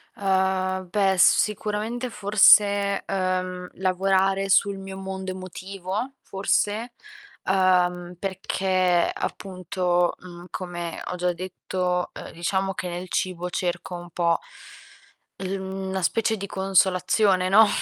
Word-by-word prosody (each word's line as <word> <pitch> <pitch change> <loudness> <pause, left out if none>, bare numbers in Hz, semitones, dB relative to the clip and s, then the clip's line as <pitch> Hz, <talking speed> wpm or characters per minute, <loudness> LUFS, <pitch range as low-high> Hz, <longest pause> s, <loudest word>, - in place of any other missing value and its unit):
Uhm, 190 -2 0
beh, 195 0 +2
s 180 - +6
sicuramente 215 +4 -3
forse, 200 -1 +5
uhm, 185 -1 -2
lavorare 195 +1 +1
sul 200 +1 +3
mio 195 0 -8
mondo 190 0 -5
emotivo, 190 +5 -5
forse, 210 +4 -1 0.5
uhm, 180 -2 +2
perché 185 -1 +1
appunto, 180 -2 -1
mhmm, 175 -1 -11
come 175 -1 -5
ho 180 - -4
già 180 0 0
detto, 180 0 -2
uhm, - - -9
diciamo 190 +3 -1
che 180 - -5
nel 175 +1 -6
cibo 180 -1 -2
cerco 180 0 -3
un 175 0 -8
po' 170 0 +1 1.0
il 190 +1 -3
mhmm, 190 0 -5
una 190 0 -2
specie 225 +5 +1
di 200 0 -5
consolazione, 190 0 +2
no, 215 +3 +7
190 Hz, 120 wpm, -24 LUFS, 180-195 Hz, 1.0 s, no